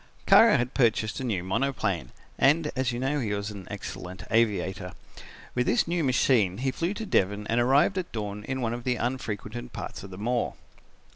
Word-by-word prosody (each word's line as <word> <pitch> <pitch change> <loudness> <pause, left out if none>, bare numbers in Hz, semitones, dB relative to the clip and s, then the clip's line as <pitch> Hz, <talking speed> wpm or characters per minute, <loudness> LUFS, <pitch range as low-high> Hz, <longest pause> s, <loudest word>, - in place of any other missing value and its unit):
"Kara - - +7
had 120 +2 -2
purchased 110 -4 +1
a - - -4
new 105 -8 -1
monoplane 135 +9 -1 0.3
and 150 +2 +4
as 130 -1 0
you 120 - -3
know 135 +3 0
he 105 -5 -1
was 100 +1 -4
an 100 -3 -9
excellent 90 +2 -7
aviator. 100 -5 +1 0.6
With 125 0 0
this 120 - +2
new 170 -1 0
machine 125 -7 +3
he 130 +3 0
flew 170 +9 -2
to 220 - -4
Devon 105 - +1
and 115 +3 +1
arrived 140 +10 +3
at 180 - -5
dawn 105 -2 -4
in 130 0 -3
one 115 -1 -1
of 120 0 -5
the 125 0 +1
unfrequented 110 - -4
parts - - -6
of 95 - -9
the 90 - -9
moor. 120 +4 -1
120 Hz, 195 wpm, -27 LUFS, 105-130 Hz, 0.6 s, Kara